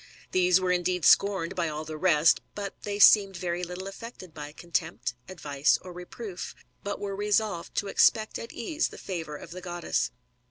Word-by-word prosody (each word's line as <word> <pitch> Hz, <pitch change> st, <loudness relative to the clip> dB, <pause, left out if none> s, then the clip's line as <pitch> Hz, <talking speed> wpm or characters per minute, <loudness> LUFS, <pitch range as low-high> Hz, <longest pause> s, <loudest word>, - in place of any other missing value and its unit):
These 180 Hz, 0 st, +4 dB
were 185 Hz, -1 st, 0 dB
indeed 180 Hz, -1 st, 0 dB
scorned 195 Hz, -3 st, +4 dB
by 170 Hz, -3 st, 0 dB
all 155 Hz, +1 st, -5 dB
the 155 Hz, 0 st, -6 dB
rest; 160 Hz, -2 st, +4 dB
but 200 Hz, -1 st, -4 dB
they 205 Hz, -1 st, -3 dB
seemed 200 Hz, -2 st, +7 dB
very 175 Hz, 0 st, -2 dB
little 180 Hz, +2 st, -5 dB
affected 195 Hz, -4 st, -9 dB
by 150 Hz, -1 st, -7 dB
contempt, 150 Hz, -7 st, -3 dB, 0.2 s
advice, 145 Hz, -5 st, +1 dB
or 180 Hz, -, -9 dB
reproof, 180 Hz, +2 st, -7 dB, 0.3 s
but 205 Hz, 0 st, -3 dB
were 200 Hz, -1 st, -4 dB
resolved 205 Hz, -3 st, 0 dB
to 205 Hz, -, 0 dB
expect 215 Hz, +2 st, +3 dB
at 230 Hz, -, -7 dB
ease 310 Hz, +7 st, -1 dB
the -, -, -11 dB
favour 165 Hz, -5 st, -5 dB
of 165 Hz, -, -10 dB
the 185 Hz, +1 st, -7 dB
goddess. 175 Hz, -1 st, -1 dB
180 Hz, 175 wpm, -28 LUFS, 170-200 Hz, 0.3 s, seemed